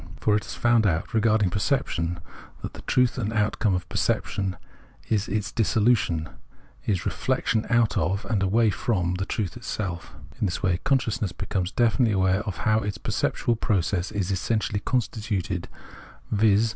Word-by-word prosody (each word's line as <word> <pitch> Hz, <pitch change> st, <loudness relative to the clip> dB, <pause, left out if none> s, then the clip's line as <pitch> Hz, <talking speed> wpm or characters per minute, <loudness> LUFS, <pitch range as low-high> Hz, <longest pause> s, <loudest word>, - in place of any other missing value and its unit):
For 105 Hz, -, +2 dB
it 105 Hz, -2 st, -1 dB
has -, -, -6 dB
found 120 Hz, -3 st, +3 dB
out, 85 Hz, +1 st, -1 dB
regarding 110 Hz, -3 st, +3 dB
perception, 90 Hz, -, 0 dB, 0.4 s
that -, -, -5 dB
the -, -, -10 dB
truth 125 Hz, 0 st, +2 dB
and 110 Hz, -2 st, -1 dB
outcome 105 Hz, -2 st, +1 dB
of 90 Hz, 0 st, -3 dB
perception 95 Hz, 0 st, -1 dB, 0.5 s
is 110 Hz, -2 st, +1 dB
its 105 Hz, -4 st, -2 dB
dissolution, 105 Hz, -8 st, +2 dB, 0.6 s
is 95 Hz, -5 st, 0 dB
reflection 110 Hz, 0 st, 0 dB
out 115 Hz, -3 st, +3 dB
of 95 Hz, +5 st, -1 dB
and 105 Hz, -4 st, 0 dB
away 110 Hz, +3 st, +3 dB
from 90 Hz, -6 st, 0 dB
the 95 Hz, -, -2 dB
truth 105 Hz, -5 st, -1 dB
into -, -, -10 dB
itself. 95 Hz, -7 st, -4 dB, 0.2 s
In 105 Hz, -, +1 dB
this 90 Hz, -, -4 dB
way 90 Hz, -1 st, +2 dB
consciousness 115 Hz, -8 st, +1 dB
becomes 95 Hz, -2 st, -2 dB
definitely 115 Hz, -1 st, +2 dB
aware 95 Hz, 0 st, +2 dB
of 100 Hz, -, -3 dB
how 110 Hz, 0 st, +4 dB
its 100 Hz, -3 st, -3 dB
perceptual 120 Hz, +5 st, 0 dB
process 95 Hz, -3 st, 0 dB
is 100 Hz, -2 st, -1 dB
essentially 105 Hz, +2 st, 0 dB
constituted, 105 Hz, -6 st, -2 dB, 0.6 s
viz. 105 Hz, +1 st, +4 dB
105 Hz, 160 wpm, -25 LUFS, 95-110 Hz, 0.6 s, how